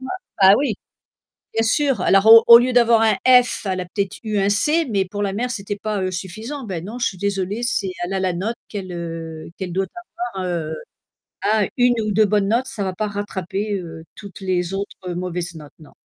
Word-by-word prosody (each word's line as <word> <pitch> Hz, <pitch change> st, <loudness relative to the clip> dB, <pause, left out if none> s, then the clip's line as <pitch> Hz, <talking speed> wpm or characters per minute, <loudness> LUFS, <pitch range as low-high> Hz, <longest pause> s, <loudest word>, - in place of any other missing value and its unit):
Bah 260 Hz, -, -8 dB, 0.3 s
bah 190 Hz, +1 st, +9 dB
oui. 270 Hz, -6 st, 0 dB, 0.8 s
Bien 225 Hz, -, +1 dB
sûr. 270 Hz, -, +1 dB
Alors 195 Hz, +2 st, +4 dB
au 225 Hz, 0 st, +9 dB
au 235 Hz, -, +11 dB
lieu 250 Hz, +1 st, +1 dB
d'avoir 235 Hz, -2 st, +5 dB
un 220 Hz, -1 st, +3 dB, 0.3 s
F, 245 Hz, -, -5 dB
elle 185 Hz, -1 st, -1 dB
a -, -, -5 dB
peut-être 195 Hz, +2 st, -3 dB
eu 215 Hz, -2 st, -2 dB
un 195 Hz, -, +2 dB
C, 300 Hz, +11 st, +2 dB
mais 195 Hz, -3 st, +1 dB
pour 205 Hz, +3 st, -6 dB
la 200 Hz, -1 st, -1 dB
mère, 245 Hz, +5 st, -2 dB
c'était 205 Hz, -2 st, -4 dB
pas, 210 Hz, -1 st, -3 dB
heu, 185 Hz, 0 st, -1 dB
suffisant. 215 Hz, +10 st, -6 dB
Ben 185 Hz, -7 st, -5 dB
non, 215 Hz, +6 st, -7 dB
suis 200 Hz, -6 st, -1 dB
désolée, 200 Hz, +2 st, -2 dB
c'est, 200 Hz, -6 st, -1 dB
elle 180 Hz, -, -3 dB
a 190 Hz, -, 0 dB
la 185 Hz, -1 st, 0 dB
note 200 Hz, +7 st, -3 dB
qu'elle, 195 Hz, -3 st, -6 dB
heu, 165 Hz, -2 st, -6 dB
qu'elle 185 Hz, -2 st, -5 dB
doit 190 Hz, +2 st, 0 dB, 0.5 s
avoir, 185 Hz, -1 st, -3 dB
heu, 160 Hz, -3 st, -3 dB, 0.7 s
à 215 Hz, -1 st, +2 dB
1 245 Hz, -1 st, +4 dB
ou 215 Hz, -1 st, -2 dB
2 215 Hz, +2 st, +4 dB
bonnes 205 Hz, -1 st, +1 dB
notes, 240 Hz, +5 st, +1 dB
ça 205 Hz, -, -4 dB
va 190 Hz, -, -2 dB
pas 215 Hz, +3 st, -2 dB
rattraper, 205 Hz, 0 st, -4 dB
heu, 165 Hz, -2 st, -9 dB
toutes 200 Hz, -3 st, -11 dB
les 185 Hz, -2 st, -1 dB
autres 195 Hz, -1 st, -5 dB
mauvaises 175 Hz, -1 st, -4 dB
notes, 150 Hz, -2 st, -12 dB
non. 155 Hz, -, -16 dB
200 Hz, 215 wpm, -21 LUFS, 185-220 Hz, 0.8 s, au